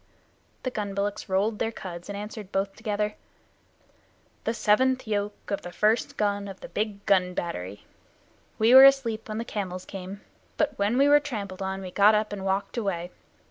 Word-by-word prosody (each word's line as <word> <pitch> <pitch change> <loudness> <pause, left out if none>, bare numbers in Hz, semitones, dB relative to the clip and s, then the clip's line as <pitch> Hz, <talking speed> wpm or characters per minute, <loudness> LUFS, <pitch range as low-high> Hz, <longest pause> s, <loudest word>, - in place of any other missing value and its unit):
The 255 - -2
gun 205 -4 -4
bullocks 200 0 -2
rolled 205 +3 +1
their 225 - 0
cuds, 175 -4 -8
and 200 - -4
answered 210 -1 -7
both 195 0 -1
together: 210 -1 -2 1.3
"The 225 - +1
seventh 255 +5 +2
yoke 205 -1 -3
of 200 - -1
the 175 - -8
first 215 +5 +1
gun 205 -1 0
of 195 -1 -9
the - - -9
Big 205 -1 -3
Gun 180 -2 +2
Battery. 100 - -5 0.7
We 225 +3 +4
were 265 +1 +11
asleep 235 -6 +3
when 215 - -3
the 230 - -3
camels 185 -5 -4
came, 195 +1 -8 0.4
but 295 -2 +1
when 205 +5 +1
we 280 +1 +5
were 290 0 +7
trampled 205 -10 -6
on 190 0 -3
we 185 - -7
got 205 +3 +5
up 210 0 0
and 195 -2 -5
walked 195 +4 -1
away. 180 -5 -2
205 Hz, 180 wpm, -26 LUFS, 195-220 Hz, 1.3 s, were